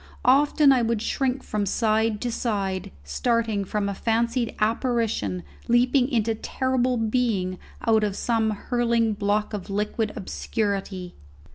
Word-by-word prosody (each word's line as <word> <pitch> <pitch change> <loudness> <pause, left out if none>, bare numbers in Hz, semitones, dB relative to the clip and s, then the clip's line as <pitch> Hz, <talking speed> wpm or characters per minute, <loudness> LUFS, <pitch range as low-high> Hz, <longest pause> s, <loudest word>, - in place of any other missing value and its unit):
Often 285 +2 +5 0.2
would 230 -1 0
I - - -5
shrink 265 0 -1
from 205 -1 -2
side 220 +1 +1
to 245 - -1
side, 200 -5 -2
starting 220 - 0
from 200 +1 -2
a 200 - -1
fancied 230 +3 0
apparition 220 - 0 0.2
leaping 250 +2 +3
into 225 -4 +1
terrible 255 +2 0
being 220 -5 0 0.3
out 220 -1 +4
of 205 -2 -1
some 225 -1 +1
hurling 230 +1 +1
block 210 +1 0
of 205 -2 -5
liquid 210 +2 -1
obscurity. 195 -3 -3
225 Hz, 130 wpm, -25 LUFS, 205-240 Hz, 0.3 s, Often